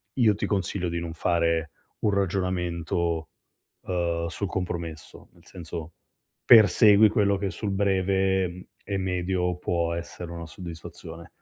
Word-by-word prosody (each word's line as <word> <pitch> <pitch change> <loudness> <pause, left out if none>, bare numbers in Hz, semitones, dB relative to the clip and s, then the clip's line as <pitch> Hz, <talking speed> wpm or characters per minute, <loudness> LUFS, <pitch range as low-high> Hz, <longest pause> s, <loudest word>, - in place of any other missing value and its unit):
io 110 -6 +4
ti - - -2
consiglio 95 -3 -1
di 85 0 -2
non 85 -1 -5
fare 85 -2 0 0.3
un 105 - +1
ragionamento, 85 -4 -1 0.5
uhm, 85 -2 -1
sul 100 +4 -3
compromesso, 85 -4 -5
nel - - -23
senso 85 -2 -8 0.5
persegui 105 -1 +7
quello 100 -2 +2
che 100 -1 -2
sul 105 - -4
breve, 95 -1 +1
uhm, 90 +1 -8 0.2
e 100 -1 -3
medio 90 -1 -1
può 85 -1 -1
essere 85 0 -6
una 85 -1 -7
soddisfazione. 85 -1 -9
90 Hz, 130 wpm, -26 LUFS, 85-95 Hz, 0.5 s, persegui